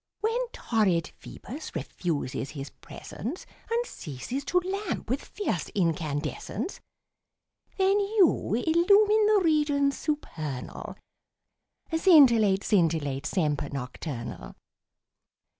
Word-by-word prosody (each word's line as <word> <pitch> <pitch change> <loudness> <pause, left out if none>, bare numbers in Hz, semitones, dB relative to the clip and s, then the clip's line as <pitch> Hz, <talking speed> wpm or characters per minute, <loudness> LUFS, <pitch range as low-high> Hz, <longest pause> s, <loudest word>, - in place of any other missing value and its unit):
When 470 +3 0
torrid 190 - 0
Ph[oe]bus 270 - -9
refuses 145 -3 -3
his 140 -1 -7
presence 270 - -8 0.2
And 470 +1 0
ceases 200 - -6
to 360 - +1
lamp 380 - -3
with 270 - -1
fierce 185 - -3
incandescence, 165 - -2 1.0
Then 390 +1 +3
you 400 - +2
illumine 400 - +4
the 425 -2 +4
regions 295 -3 +2
supernal, 155 - -4 1.0
Scintillate, 235 - +6
scintillate, 160 -8 +1
semper 150 -6 0
nocturnal. 125 -1 -6
235 Hz, 90 wpm, -27 LUFS, -, 1.0 s, Scintillate